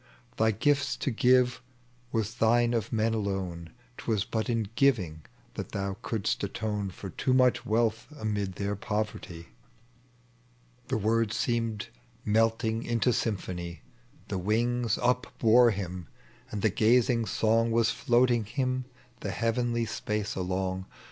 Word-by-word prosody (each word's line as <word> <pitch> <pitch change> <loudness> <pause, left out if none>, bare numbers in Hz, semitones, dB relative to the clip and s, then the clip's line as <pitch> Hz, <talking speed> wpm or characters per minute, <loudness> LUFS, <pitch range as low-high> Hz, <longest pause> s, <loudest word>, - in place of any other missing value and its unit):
Thy 110 - +3
gifts 140 +7 +1
to 135 - -1
give 125 0 +3 0.5
was 110 -1 -1
thine 120 0 +3
of 115 -2 -1
men 110 0 +1
alone: 95 -6 -3 0.3
'Twas 110 -3 -1
but 110 +2 -2
in 115 -3 0
giving 100 - +2 0.3
that - - -6
thou 100 -1 -2
couldst 110 -3 -1
atone 105 0 -2
For 95 +1 -8
too 130 +9 +1
much 125 -1 +3
wealth 115 +1 +1
amid 105 -4 -2
their 100 +2 -2
poverty." 105 -5 -4 0.7
— 125 0 -34
The - - 0
words 115 +1 +1
seemed 115 -4 -1 0.4
melting 110 +1 +2
into 120 0 +1
symphony. 90 - -3 0.4
The 95 - -2
wings 115 +4 +1
upbore 120 -1 +4
him, 90 -4 -5 0.4
and 105 - -5
the 110 - +4
gazing 115 +2 +3
song 115 +1 +2
Was 115 0 +3
floating 120 -2 +2
Tiim 130 +3 -2 0.3
the 100 - -4
heavenly 115 +3 0
spaee 105 -1 -3
along. 95 0 -2
110 Hz, 130 wpm, -29 LUFS, 100-120 Hz, 0.7 s, upbore